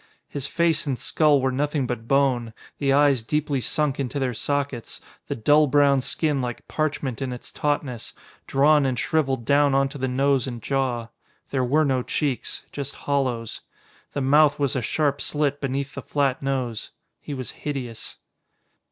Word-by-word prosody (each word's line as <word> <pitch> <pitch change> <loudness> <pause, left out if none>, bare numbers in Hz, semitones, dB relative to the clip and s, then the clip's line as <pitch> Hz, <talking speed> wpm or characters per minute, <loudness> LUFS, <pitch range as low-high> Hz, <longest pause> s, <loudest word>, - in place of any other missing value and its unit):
His 140 -1 -3
face 165 -3 +1
and 135 -3 0
skull 150 +4 +3
were 130 0 +1
nothing 145 +1 0
but 120 -2 -4
bone, 130 -4 +2 0.3
the 140 -2 +2
eyes 140 -3 +4
deeply 145 +2 -1
sunk 150 +1 0
into 140 +1 -2
their 130 -3 0
sockets, 140 -1 -3 0.3
the - - -2
dull 150 +6 +4
brown 140 -1 +4
skin 145 +1 0
like 120 -1 -5
parchment 150 -5 -2
in 130 -1 -2
its 125 - -8
tautness, 145 -5 -2 0.3
drawn 145 +1 +4
and 130 -2 -1
shriveled 135 -6 0
down 140 0 +4
onto 135 +1 +1
the 130 - 0
nose 135 0 +2
and 120 -2 -5
jaw. 125 -2 -1 0.4
There 130 -2 +1
were 150 +5 +3
no 130 -2 +1
cheeks. 135 0 -2
Just 140 -1 -5
hollows. 130 -5 -2 0.5
The 140 - -2
mouth 145 +2 +5
was 140 -3 0
a 130 - 0
sharp 145 +3 0
slit 145 -1 -1
beneath 140 0 -2
the - - -6
flat 140 -3 0
nose. 130 -5 -2 0.3
He 145 - -6
was 130 -2 -5
hideous. 130 -6 -6
135 Hz, 165 wpm, -24 LUFS, 125-145 Hz, 0.5 s, mouth